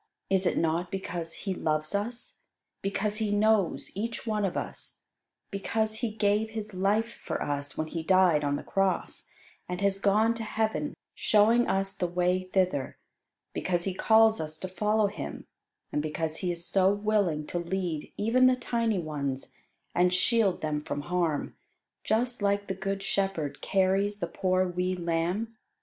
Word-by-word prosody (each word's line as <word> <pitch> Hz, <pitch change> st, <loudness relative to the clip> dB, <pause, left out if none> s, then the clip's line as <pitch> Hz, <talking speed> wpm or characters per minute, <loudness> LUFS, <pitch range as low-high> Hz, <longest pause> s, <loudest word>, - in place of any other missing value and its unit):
Is 190 Hz, -1 st, +3 dB
it -, -, +1 dB
not 165 Hz, +2 st, +1 dB
because 175 Hz, -3 st, -4 dB
He 195 Hz, -, 0 dB
loves 155 Hz, -3 st, -1 dB
us; 230 Hz, +4 st, -3 dB, 0.4 s
because 205 Hz, +2 st, -1 dB
He 220 Hz, -1 st, 0 dB
knows 205 Hz, -2 st, +2 dB
each 225 Hz, +5 st, -4 dB
one 215 Hz, -2 st, 0 dB
of 185 Hz, -, -2 dB
us; -, -, -5 dB, 0.5 s
because 220 Hz, +2 st, -1 dB
He 235 Hz, -, 0 dB
gave 210 Hz, 0 st, +1 dB
His 215 Hz, -2 st, -5 dB
life 210 Hz, +5 st, +1 dB
for -, -, -3 dB
us 145 Hz, 0 st, -3 dB
when 155 Hz, -, 0 dB
He 165 Hz, +1 st, -4 dB
died 180 Hz, -3 st, +4 dB
on 145 Hz, 0 st, +1 dB
the -, -, -5 dB
cross, 195 Hz, -1 st, -1 dB, 0.4 s
and 180 Hz, 0 st, -3 dB
has 200 Hz, -1 st, +2 dB
gone 215 Hz, +3 st, +3 dB
to 230 Hz, -1 st, -5 dB
heaven 220 Hz, +6 st, -1 dB, 0.2 s
showing 225 Hz, +3 st, +4 dB
us 195 Hz, 0 st, +1 dB
the 180 Hz, -, -1 dB
way 180 Hz, +1 st, +1 dB
thither; 180 Hz, -9 st, 0 dB, 0.6 s
because 175 Hz, -2 st, 0 dB
He 195 Hz, -, -1 dB
calls 220 Hz, +2 st, +5 dB
us 155 Hz, 0 st, -5 dB
to 185 Hz, -, -5 dB
follow 210 Hz, +4 st, +1 dB
Him; 205 Hz, +1 st, -5 dB, 0.5 s
and 150 Hz, -, 0 dB
because 155 Hz, +1 st, -2 dB
He 180 Hz, -2 st, -1 dB
is 170 Hz, 0 st, -3 dB
so 190 Hz, 0 st, +4 dB
willing 205 Hz, -7 st, +1 dB
to 175 Hz, -, -3 dB
lead 170 Hz, -3 st, -3 dB
even 250 Hz, +5 st, +4 dB
the 255 Hz, -, +5 dB
tiny 230 Hz, -3 st, 0 dB
ones, 140 Hz, -5 st, -3 dB, 0.4 s
and 180 Hz, 0 st, +3 dB
shield 195 Hz, +1 st, +2 dB
them 155 Hz, -1 st, -1 dB
from 145 Hz, -1 st, -4 dB
harm, 170 Hz, -2 st, -1 dB, 0.5 s
just 240 Hz, +2 st, 0 dB
like 200 Hz, 0 st, +1 dB
the 190 Hz, -, -2 dB
good 195 Hz, +1 st, -3 dB
shepherd 195 Hz, -7 st, -1 dB
carries 195 Hz, +1 st, +2 dB
the 200 Hz, -, -2 dB
poor 185 Hz, +2 st, +1 dB
wee 180 Hz, +1 st, -1 dB
lamb? 175 Hz, +6 st, -1 dB
195 Hz, 165 wpm, -28 LUFS, 170-215 Hz, 0.6 s, calls